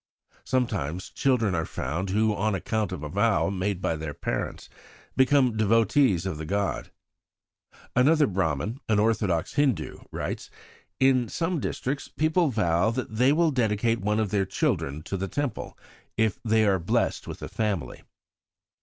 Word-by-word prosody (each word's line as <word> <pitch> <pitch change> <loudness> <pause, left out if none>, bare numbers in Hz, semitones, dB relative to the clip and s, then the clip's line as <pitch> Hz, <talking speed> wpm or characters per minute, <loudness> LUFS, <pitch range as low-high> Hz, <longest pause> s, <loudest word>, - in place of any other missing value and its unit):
Sometimes 95 - -1
children 120 -7 +1
are 80 -2 0
found 85 +9 -3
who, 105 +2 +2
on 105 +1 0
account 110 +3 -1
of 70 - -5
a - - -3
vow 100 +3 +1
made 95 -1 -2
by 80 - +1
their 75 -2 -5
parents, - - -4 0.5
become 130 -3 +4
devotees 110 - +3
of 90 -5 -3
the 80 - -5
gods." 100 +1 -1 1.1
Another 150 +5 +5
Brahman, 95 - -1
an 110 - +3
orthodox 105 -6 +1
Hindu, 135 - 0
writes: - - -4 0.5
"In 130 -3 +3
some 170 0 -1
districts 140 +1 -3
people 155 +1 +1
vow 90 -4 +2
that 115 -2 -4
they 130 +3 +5
will 165 +1 +3
dedicate 115 -2 +1
one 105 +2 +1
of 105 -3 -1
their 100 -2 +1
children 75 -5 -1
to 95 - -4
the 95 +1 -3
Temple 145 -1 -4 0.4
if 110 -3 +1
they 110 -1 +3
are 95 -2 +3
blessed 85 - 0
with - - -7
a - - -4
family. 105 -7 -2
110 Hz, 155 wpm, -26 LUFS, 95-125 Hz, 1.1 s, Another